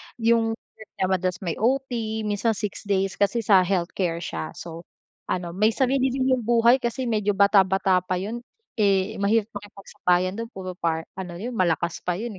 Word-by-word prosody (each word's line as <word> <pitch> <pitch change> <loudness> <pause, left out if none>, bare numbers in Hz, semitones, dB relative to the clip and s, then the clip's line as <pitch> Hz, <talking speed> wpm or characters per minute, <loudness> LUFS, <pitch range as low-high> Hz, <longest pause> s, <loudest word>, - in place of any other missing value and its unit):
'yong 225 -1 +2
work 220 -1 -18
niya 185 - 0
madalas 185 -1 0
may 170 -3 -2
OT 230 -3 -1
minsan 210 +2 +1
6 205 -1 -5
days 195 -1 0
kasi 210 +3 +1
sa 195 -2 +5
healthcare 175 -2 -1
siya. 80 -1 -5
So, 170 0 -9 0.4
ano 175 -2 -2
may 215 +3 +3
sarili 265 0 +2
din 260 0 0
'yong 245 - -5
buhay 235 +2 +5
kasi 235 +2 -2
medyo 210 -3 +1
bata-bata 190 -2 +4
pa 185 - -2
yun. 215 +5 -4 0.4
Eh, 200 +1 +2
mahirap 215 +1 +2
makipagsabayan 190 -2 -1
do'n 230 0 -5
puro 185 -1 -5
par 165 -2 -1 0.2
ano 180 -2 -6
'yon 235 +5 -4
malakas 170 -3 0
pa 180 - -1
'yon, 230 +5 -4
200 Hz, 175 wpm, -24 LUFS, 185-230 Hz, 0.4 s, sa